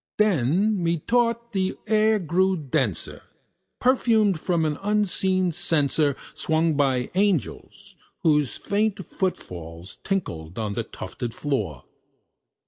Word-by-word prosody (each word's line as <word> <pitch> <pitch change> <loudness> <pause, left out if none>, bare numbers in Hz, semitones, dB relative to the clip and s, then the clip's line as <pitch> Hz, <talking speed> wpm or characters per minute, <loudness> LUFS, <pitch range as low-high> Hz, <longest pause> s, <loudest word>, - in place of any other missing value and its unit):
Then, 195 - +2
methought, 230 +8 0
the 190 -1 0
air 215 0 +3
grew 185 +1 +1
denser, 135 - -2 0.6
perfumed 225 -7 +3
from 170 -1 0
an 150 -1 -1
unseen 190 -3 +1
censer 150 -3 +1 0.2
Swung 160 0 +1
by 135 -4 +1
Seraphim 190 -4 +1 0.6
whose 150 -5 +2
foot 200 -3 -1
falls 85 0 -10
tinkled 90 - -3
on 105 -2 -2
the - - -2
tufted 120 -2 -6
floor. 105 - -2
170 Hz, 105 wpm, -24 LUFS, 140-205 Hz, 0.6 s, air